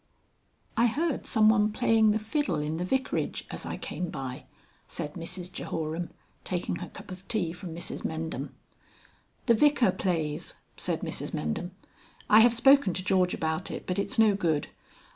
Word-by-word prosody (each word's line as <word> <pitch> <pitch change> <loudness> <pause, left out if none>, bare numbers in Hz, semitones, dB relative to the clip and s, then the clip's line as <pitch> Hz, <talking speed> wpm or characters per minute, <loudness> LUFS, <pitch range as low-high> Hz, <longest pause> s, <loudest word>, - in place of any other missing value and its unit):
XXXI - - +4
"I - - +6
heard 300 +5 -1
some 220 -3 +4
one 215 -1 +4
playing 220 -1 +4
the 210 - +3
fiddle 225 - -1
in 150 +2 -2
the 175 - -2
Vicarage, 260 +8 -1
as - - -5
I - - -4
came 180 -1 -4
by," 130 -2 -6 0.4
said 150 -3 -5
Mrs 180 +1 -4
Jehoram, 165 0 -3 0.3
taking 175 -1 -2
her - - -7
cup - - -11
of 185 +1 -10
tea 180 -8 0
from 180 -2 -8
Mrs 170 - -4
Mendham. 160 -4 -3 1.0
"The 235 - +5
Vicar 260 -4 +4
plays," 165 -4 -1 0.2
said - - -1
Mrs - - -3
Mendham. 75 - -2 0.6
"I 215 - +9
have 235 +1 +6
spoken 270 -6 +5
to 185 - -2
George 185 -1 +2
about 160 +2 -2
it, - - -6
but 180 +1 -1
it's 240 +6 -1
no 220 -2 +6
good. 165 -7 0
185 Hz, 170 wpm, -28 LUFS, 165-220 Hz, 1.0 s, I